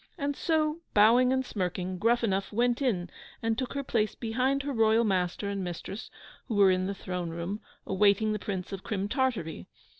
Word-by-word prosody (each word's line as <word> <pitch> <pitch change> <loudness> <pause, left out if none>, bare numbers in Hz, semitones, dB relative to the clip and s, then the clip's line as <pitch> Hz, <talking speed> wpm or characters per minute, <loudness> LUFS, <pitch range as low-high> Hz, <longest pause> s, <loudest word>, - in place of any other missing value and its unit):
And 285 -2 -1
so, 310 0 +1 0.2
bowing 235 +5 +6
and 260 0 +1
smirking, 185 -3 -3
Gruffanuff 225 -3 +1
went 240 +4 +1
in 185 -10 0 0.3
and 225 0 +1
took 255 +1 -3
her 280 0 -2
place 215 -5 0
behind 255 +4 0
her 285 0 -3
Royal 225 0 +4
Master 190 -1 0
and 200 -1 -2
Mistress, 180 +4 -6 0.4
who 230 - -2
were 200 -2 +6
in 185 0 +1
the 200 - -3
throne 180 -3 -4
room, 170 +6 -4 0.2
awaiting 205 +2 +3
the 210 - -2
Prince 190 -2 -4
of 195 - -6
Crim 200 -2 -2
Tartary. 205 - -1
210 Hz, 180 wpm, -29 LUFS, 190-245 Hz, 0.4 s, bowing